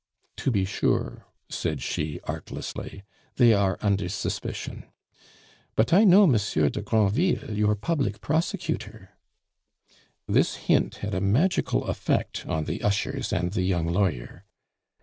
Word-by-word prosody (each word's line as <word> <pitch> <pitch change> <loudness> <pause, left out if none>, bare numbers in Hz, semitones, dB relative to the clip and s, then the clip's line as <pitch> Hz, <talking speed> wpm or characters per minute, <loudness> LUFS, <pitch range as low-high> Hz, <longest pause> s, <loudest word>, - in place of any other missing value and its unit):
"To - - -1
be 100 -6 +1
sure," 95 - -1 0.2
said - - -3
she 75 -1 -3
artlessly, 100 - -6 0.3
"they 120 -3 +6
are 100 -3 +1
under 100 -3 +1
suspicion. 100 - -4 0.9
But 110 +8 +2
I 200 +5 +7
know 200 +1 +8
Monsieur 100 - +2
de - - -4
Granville, 110 - +1
your 105 0 +2
public 105 -4 -1
prosecutor 160 +6 -3 0.6
" - - -35
This - - +2
hint - - +1
had 105 - -3
a 95 - -1
magical 125 - +2
effect - - -2
on 80 - -1
the - - -4
ushers 125 +6 -1
and 90 +1 0
the 95 - -1
young 90 -3 0
lawyer. 85 -11 -1
105 Hz, 130 wpm, -26 LUFS, 95-130 Hz, 0.9 s, know